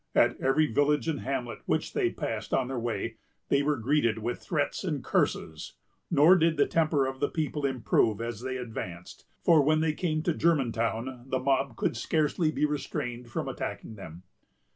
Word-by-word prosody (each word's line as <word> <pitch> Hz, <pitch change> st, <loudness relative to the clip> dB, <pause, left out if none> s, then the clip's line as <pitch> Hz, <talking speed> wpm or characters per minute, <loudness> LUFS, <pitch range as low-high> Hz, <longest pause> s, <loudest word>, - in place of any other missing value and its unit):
At -, -, +4 dB
every 135 Hz, +4 st, +3 dB
village 145 Hz, +1 st, +1 dB
and 155 Hz, -4 st, -1 dB
hamlet 125 Hz, -3 st, -3 dB
which -, -, 0 dB
they -, -, +2 dB
passed -, -, -3 dB
on 130 Hz, -2 st, +1 dB
their 130 Hz, -2 st, -2 dB
way, 115 Hz, -1 st, -3 dB, 0.3 s
they 140 Hz, -, +3 dB
were 145 Hz, +1 st, +1 dB
greeted 115 Hz, -2 st, +1 dB
with 115 Hz, +2 st, -3 dB
threats -, -, -2 dB
and -, -, -2 dB
curses; 80 Hz, -1 st, -1 dB, 0.3 s
nor 165 Hz, +3 st, +6 dB
did 165 Hz, -2 st, +2 dB
the 145 Hz, -, +5 dB
temper 155 Hz, -4 st, +2 dB
of 130 Hz, 0 st, -4 dB
the 145 Hz, -, +1 dB
people 150 Hz, -3 st, -1 dB
improve 115 Hz, -4 st, +1 dB
as 115 Hz, -1 st, -4 dB
they 130 Hz, 0 st, -3 dB
advanced, 90 Hz, -8 st, -7 dB, 0.2 s
for, 165 Hz, -3 st, +6 dB
when 155 Hz, +2 st, +3 dB
they 160 Hz, -1 st, +1 dB
came 155 Hz, -1 st, -1 dB
to 170 Hz, -, +1 dB
Germantown, 125 Hz, -5 st, 0 dB
the 130 Hz, -, 0 dB
mob 135 Hz, -1 st, 0 dB
could -, -, -1 dB
scarcely 155 Hz, +5 st, +1 dB
be 150 Hz, -, +1 dB
restrained 125 Hz, -4 st, -4 dB
from -, -, -3 dB
attacking -, -, -5 dB
them. 90 Hz, -4 st, -10 dB
135 Hz, 180 wpm, -28 LUFS, 115-150 Hz, 0.3 s, nor